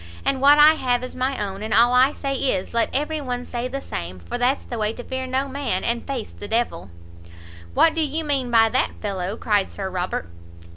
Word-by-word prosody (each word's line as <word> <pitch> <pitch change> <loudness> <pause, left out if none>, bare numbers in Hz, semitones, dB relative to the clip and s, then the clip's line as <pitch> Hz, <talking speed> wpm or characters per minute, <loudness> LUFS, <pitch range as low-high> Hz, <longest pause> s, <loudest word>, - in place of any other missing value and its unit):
And 270 -1 0
what 285 +2 +7
I 300 +1 +8
have 250 -5 0
is 255 - -7
my 260 +1 -1
own, 195 -1 -4
and 215 -1 -1
all 240 +2 +5
I 255 +3 +5
say 275 -2 -3
is, 255 -9 -1
let 235 -1 +2
every 300 +3 -1
one 250 -2 -4
say 240 0 -3
the 275 +2 -5
same, 85 +2 -5
for 85 - -7
that's 255 +3 +1
the 235 - -5
way 215 +1 0
to 245 - -8
fear 260 +1 -4
no 265 +2 -1
man, 270 -8 -2
and 235 0 -2
face 265 -5 -4
the 205 - -9
d 220 - -1
l." 95 - -3 0.9
"What 325 - +5
do 325 - 0
you 310 +1 0
mean 275 -4 0
by 225 -1 +5
that, 255 +3 0
fellow?" 195 0 -3
cried 205 -4 +1
Sir 190 -2 -5
Robert. 180 - -3
245 Hz, 230 wpm, -23 LUFS, 210-275 Hz, 0.9 s, I